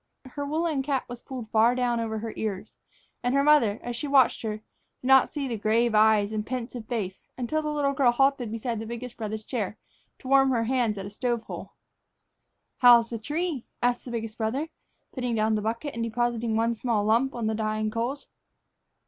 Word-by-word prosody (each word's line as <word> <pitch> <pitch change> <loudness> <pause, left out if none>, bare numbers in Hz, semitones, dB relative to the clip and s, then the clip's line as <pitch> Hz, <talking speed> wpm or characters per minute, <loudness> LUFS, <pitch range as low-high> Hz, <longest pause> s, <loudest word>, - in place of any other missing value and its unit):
Her 285 - -4
woolen 310 -1 0
cap 270 -1 -1
was 245 -1 -8
pulled 245 -5 -8
far 230 +2 +4
down 245 -2 +1
over 220 -1 -2
her 220 0 -5
ears, 205 -4 -4 0.5
and 245 +2 0
her 275 - +4
mother, 280 -9 +4
as 240 0 -4
she 295 - -4
watched 275 -3 +4
her, 215 -2 -3
did 215 - -22 0.4
not 265 0 +5
see 285 -3 -3
the 230 -4 -3
grave 225 +2 +2
eyes 215 -1 +4
and 215 -1 -2
pensive 240 -1 -5
face 200 -6 -4
until 260 +5 -1
the 305 - -3
little 285 -2 +1
girl 265 -2 +4
halted 270 -2 +2
beside 230 0 -3
the 220 - -6
biggest 235 +1 -6
brother's 220 -1 -4
chair 215 -3 -3 0.4
to 260 - -12
warm 270 0 +5
her 235 -3 +1
hands 235 -3 0
at 195 - -5
a 200 - -7
stove 240 +1 -1
hole. - - -8 1.1
"How's 240 -2 +7
the 230 - -3
tree?" 300 +2 -3 0.2
asked 245 0 +1
the - - -9
biggest 225 -1 -5
brother, 260 +8 -1 0.4
putting 250 -3 -2
down 220 0 +2
the 215 - 0
bucket 230 +7 -3
and 230 - -4
depositing 235 0 -1
one 230 +1 +2
small 230 -2 0
lump 235 +5 +2
on 235 -2 -3
the 220 - +1
dying 215 0 -1
coals. 240 +6 -3
235 Hz, 200 wpm, -27 LUFS, 220-265 Hz, 1.1 s, How's